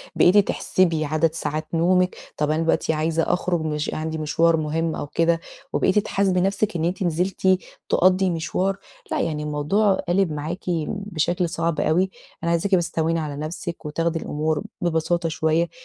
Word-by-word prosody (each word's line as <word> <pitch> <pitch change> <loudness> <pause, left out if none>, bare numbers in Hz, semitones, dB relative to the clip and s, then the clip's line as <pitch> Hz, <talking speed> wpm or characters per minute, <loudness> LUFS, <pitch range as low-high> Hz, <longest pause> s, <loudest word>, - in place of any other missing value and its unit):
بقيتِ 180 +4 +5
تحسبي 175 -5 +2
عدد 155 +2 +1
ساعات 155 -1 -3
نومِك. 180 +2 +3 0.2
طَب 150 0 +1
أنا 155 +1 +1
دلوقتي 165 0 +1
عايزه 160 +1 0
أخرُج 175 -1 0
مش 150 -1 -2
عندي 160 0 -3
مشوار 160 +2 +2
مهم 160 +1 -1
أو - - -4
كده 165 +2 +2 0.3
وبقيتِ 190 +2 +3
تحاسبي 195 -2 +1
نفسِك 200 +2 0
إن 165 -1 0
أنتِ 180 +2 -1
نزلتِ 180 +3 0 0.4
تقضِي 185 +1 +4
مشوار، 180 +3 -1 0.3
لأ - - 0
يعني 150 -2 -2
الموضوع 150 +8 +2
قالب 180 0 +2
معاكِ 155 +5 -4 0.2
بشكل 175 -3 -1
صعب 170 -2 -1
أوي، 180 +4 +2 0.3
أنا 170 - +1
عايزاكِ 180 +4 +2
بس 175 -2 0
تهوّني 165 +1 0
على 150 -2 -4
نفسِك 160 +3 -5
وتاخدي 165 +2 -1
الأمور 155 +1 -1 0.2
ببساطة 170 0 0
شوية 160 +2 +1
165 Hz, 160 wpm, -23 LUFS, 155-180 Hz, 0.4 s, بقيتِ